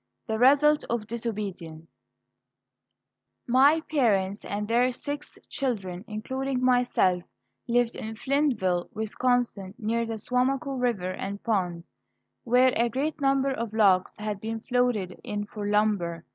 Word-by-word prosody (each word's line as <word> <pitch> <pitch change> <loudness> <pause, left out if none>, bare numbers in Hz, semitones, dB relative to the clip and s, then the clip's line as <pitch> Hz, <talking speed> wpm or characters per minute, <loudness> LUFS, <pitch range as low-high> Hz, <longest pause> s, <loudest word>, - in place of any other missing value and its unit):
THE 220 -2 -2
RESULT 290 +4 +5
OF 235 -2 -1
DISOBEDIENCE 200 -8 -6 1.4
My 275 +6 +5
parents 210 -10 +1
and 205 +1 -3
their 240 +3 +3
six 290 +4 -6
children, 200 -10 -3
including 255 +4 -2
myself, 245 -8 +3 0.5
lived 240 0 +2
in 220 0 -6
Flintville, 230 -10 0
Wisconsin, 220 -2 -1
near 230 +1 -1
the 225 -1 -3
Suamico 260 +5 0
River 205 -7 0
and 200 +2 -5
Pond, 180 -7 -1 0.6
where 250 +2 +4
a 235 +1 +2
great 285 +5 -2
number 275 0 +2
of 230 -4 -4
logs 195 -4 +3
had 210 -2 -4
been 225 0 -4
floated 245 -7 0
in 205 0 -3
for 210 0 -6
lumber. 200 -6 +1
225 Hz, 125 wpm, -27 LUFS, 200-255 Hz, 1.4 s, RESULT